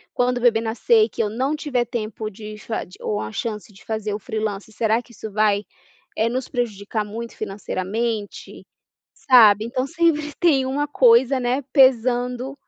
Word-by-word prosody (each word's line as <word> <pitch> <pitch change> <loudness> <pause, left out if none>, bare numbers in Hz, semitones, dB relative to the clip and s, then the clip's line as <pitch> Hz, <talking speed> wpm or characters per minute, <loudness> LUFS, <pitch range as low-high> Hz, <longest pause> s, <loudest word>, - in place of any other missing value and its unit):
quando 250 0 +1
o - - -9
bebê 230 -2 +4
nascer, 430 - +2
que - - -3
eu 210 - -1
não 260 +7 -1
tiver 265 -5 -1
tempo 220 -2 -5
de 215 +1 -9
fa 220 - -4
de 185 - -16
ou 210 - -2
a 110 - -5
chance 210 - -5
de 195 - -19
fazer 220 -2 -3
o - - -5
freelancer, 215 -2 -4
será 220 +1 +1
que 245 - -21
isso 220 -1 -8
vai, 210 0 +2 0.5
eh, 220 - +2
nos 255 +2 -3
prejudicar 215 -3 -3
muito 230 +3 -7
financeiramente?", 210 +2 -4 0.5
sabe? 220 -5 +6
Então 255 +2 -2
sempre 305 -1 0
tem 285 -7 +3
uma 285 +3 -1
coisa, 255 0 +4
né, 250 +3 0
pesando, 250 -1 +2
230 Hz, 170 wpm, -22 LUFS, 215-255 Hz, 0.5 s, sabe